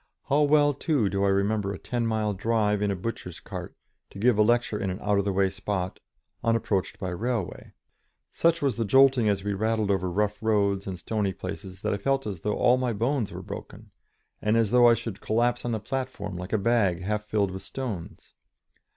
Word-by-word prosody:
How 145 +2 +4
well, 145 0 +4
too, 140 - +1
do 100 +1 -1
I - - +3
remember 100 +1 +1
a 100 - -5
ten 120 +2 -2
mile 110 -2 0
drive 105 0 +1
in 105 - +1
a 100 - 0
butcher's 90 -3 -5
cart, - - -8 0.3
to - - -12
give 120 +3 +3
a 105 - +3
lecture 120 -1 +2
in 95 - -1
an 90 - -3
out 105 -1 +1
of 100 - -1
the 100 - +1
way 95 0 +2
spot, 95 -2 -3 0.4
unapproached 115 -4 0
by 95 - -4
railway. 110 +2 -3 0.6
Such 170 -1 +2
was 135 -6 +1
the 115 - +1
jolting 130 0 +5
as 100 -2 0
we 105 0 -1
rattled 110 0 0
over 95 -2 0
rough 105 +3 -1
roads 100 -3 +1
and 95 -2 -4
stony 100 +1 -1
places, 95 0 -7
that - - 0
I - - -1
felt 135 +6 0
as 100 -5 -4
though 105 +4 -1
all 125 +1 +4
my 125 -2 0
bones 115 +1 0
were - - -7
broken, - - -9 0.5
and 105 +2 +2
as 110 -3 +2
though 120 -1 +6
I 120 - +6
should 115 -3 -6
collapse 120 +2 +1
on 120 - -1
the 110 - -1
platform 105 -4 -4
like 90 +3 -6
a - - +4
bag 100 -5 +1
half 105 +2 -2
filled 105 -2 0
with 95 0 -6
stones. 115 -11 -7
105 Hz, 210 wpm, -27 LUFS, 100-120 Hz, 0.6 s, though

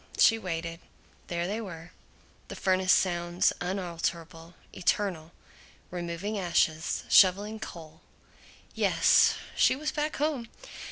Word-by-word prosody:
She 225 -1 +5
waited. 165 -3 -5 0.5
There 170 0 -2
they 210 +5 -3
were, 170 -5 -9 0.6
the - - -8
furnace 185 0 +1
sounds, 175 -1 +2
unalterable, 170 -2 -4 0.2
eternal: 180 -3 -1 0.6
removing 180 +4 -4
ashes, 165 -3 0
shoveling 205 +3 +4
coal. 160 -4 -10 0.7
Yes. - - +4 0.2
She - - +4
was 300 +3 -3
back 300 +1 -2
home! 280 -6 -2
180 Hz, 105 wpm, -28 LUFS, 170-205 Hz, 0.7 s, She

